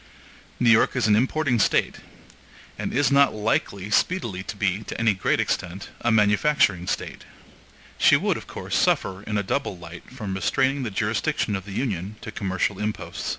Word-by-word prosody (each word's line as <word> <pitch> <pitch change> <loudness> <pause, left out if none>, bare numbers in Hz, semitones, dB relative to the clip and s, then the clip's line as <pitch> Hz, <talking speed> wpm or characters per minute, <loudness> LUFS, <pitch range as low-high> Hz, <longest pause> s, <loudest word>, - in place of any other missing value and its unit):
New 120 -2 +5
York 110 - +4
is - - +1
an 105 -1 +4
importing 130 +2 +1
State, - - +2 0.8
and - - -4
is 145 +2 +2
not 140 -2 +4
likely 105 -2 -1
speedily 115 - 0
to 95 - -6
be, 100 0 0
to - - -6
any 110 -2 +3
great 95 - 0
extent, 90 +2 -2
a 120 - +1
manufacturing 105 -3 +3
State. - - -4 0.8
She - - +6
would, - - 0
of - - -8
course, - - -5
suffer 95 0 +1
in 105 0 -3
a 100 - 0
double 100 -2 -2
light 85 0 -11
from 110 -7 -6
restraining 130 +9 +1
the 120 - -2
jurisdiction 105 +1 -1
of 95 -2 -5
the 105 - -9
Union 100 -4 -3
to 110 - -7
commercial 95 -1 -2
imposts. 105 0 -4
105 Hz, 175 wpm, -24 LUFS, 95-120 Hz, 0.8 s, She